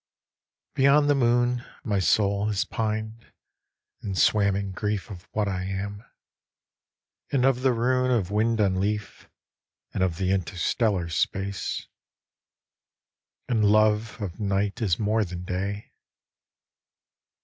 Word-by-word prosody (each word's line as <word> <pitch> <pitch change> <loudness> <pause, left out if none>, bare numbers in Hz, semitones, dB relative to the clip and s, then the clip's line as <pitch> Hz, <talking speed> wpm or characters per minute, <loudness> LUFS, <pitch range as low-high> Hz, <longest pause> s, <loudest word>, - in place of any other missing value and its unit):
Beyond 145 +2 +4
the - - +5
moon 120 -1 +2 0.2
my 100 -3 0
soul 100 +3 +2
has 105 -2 0
pined, 110 +1 -3 0.7
And 95 -2 -4
swam 100 -1 +3
in 100 -1 -3
grief 105 +2 -3
of 95 -1 -10
what 105 -1 0
I 95 -1 -2
am, 100 +2 -4 1.3
And 130 -2 +2
of 130 -2 +2
the 130 0 +3
rune 125 +2 +1
of 105 -7 +1
wind 110 +2 +1
on 95 -3 +2
leaf, 105 +1 -3 0.6
And - - -2
of 90 -3 +1
the 95 0 0
interstellar 95 0 0
space. 95 +5 -2 1.6
And 115 -3 +1
love 110 +2 +3
of 95 -3 -5
night 100 +1 -1
is 95 -7 +1
more 110 +1 +1
than 90 -2 -6
day. 100 +3 -4
105 Hz, 125 wpm, -26 LUFS, 95-115 Hz, 1.6 s, the